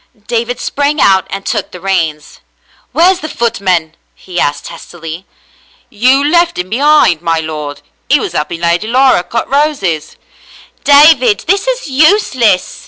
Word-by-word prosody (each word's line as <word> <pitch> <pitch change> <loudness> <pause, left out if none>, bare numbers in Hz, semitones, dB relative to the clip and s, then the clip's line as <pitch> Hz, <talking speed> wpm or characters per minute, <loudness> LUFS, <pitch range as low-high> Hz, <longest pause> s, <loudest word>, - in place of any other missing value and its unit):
David 240 +1 -2
sprang 290 +3 -1
out 190 -5 +3
and 195 0 -6
took - - -2
the 180 - -11
reins. 165 -5 -3 0.5
"Where's 350 +5 +3
the 310 - -6
footman 190 - -1
.f^" - - -36 0.2
he 180 -2 -6
asked 145 0 -1
testily. 165 +1 -9 0.6
"You 255 +6 +2
left 340 +2 +2
'im 180 +1 -5
behind, 280 - +3
my 165 -1 0
lord. 150 -2 -6 0.3
He 290 - +4
was 180 - -5
'elping 165 +1 -3
Lady 170 +4 0
Laura 255 -4 +3
cut 230 +6 -4
roses." 270 - -1 0.4
" - - -20 0.3
David, 315 +10 +5
this 395 +5 0
is - - -2
useless. 265 - +1
225 Hz, 150 wpm, -12 LUFS, -, 0.6 s, David